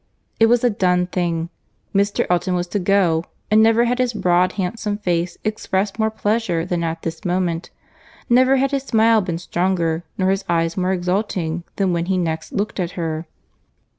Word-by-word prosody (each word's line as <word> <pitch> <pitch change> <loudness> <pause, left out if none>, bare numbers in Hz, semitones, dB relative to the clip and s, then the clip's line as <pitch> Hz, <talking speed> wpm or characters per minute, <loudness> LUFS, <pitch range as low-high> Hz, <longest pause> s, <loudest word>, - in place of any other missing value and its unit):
It 225 - +6
was 240 +1 +3
a 245 - +5
done 180 -3 +2
thing; 170 -2 -2 0.4
Mr. 200 +1 +1
Elton 180 +1 +1
was 175 0 0
to 205 - -1
go, 180 -4 +2 0.3
and 215 +1 +6
never 225 +2 +4
had 245 +1 0
his 250 -1 +1
broad 180 -3 +2
handsome 205 +2 -2
face 175 -3 -1
expressed 210 -1 -2
more 220 0 +2
pleasure 215 -6 -1
than 175 -2 -2
at 165 0 -3
this 165 -1 -5
moment; 175 -1 -1 0.6
never 255 +2 +5
had 270 +1 +1
his 275 -1 0
smile 225 -3 +3
been 175 -3 -3
stronger, 175 -1 -1
nor 185 0 +2
his 195 0 -1
eyes 165 -1 +1
more 185 0 0
exulting 180 -2 -1
than 190 -3 +1
when 170 0 0
he 190 -1 +1
next 160 -2 -2
looked 205 0 -2
at 175 -1 -2
her. 160 -1 -3
185 Hz, 180 wpm, -20 LUFS, 170-215 Hz, 0.6 s, It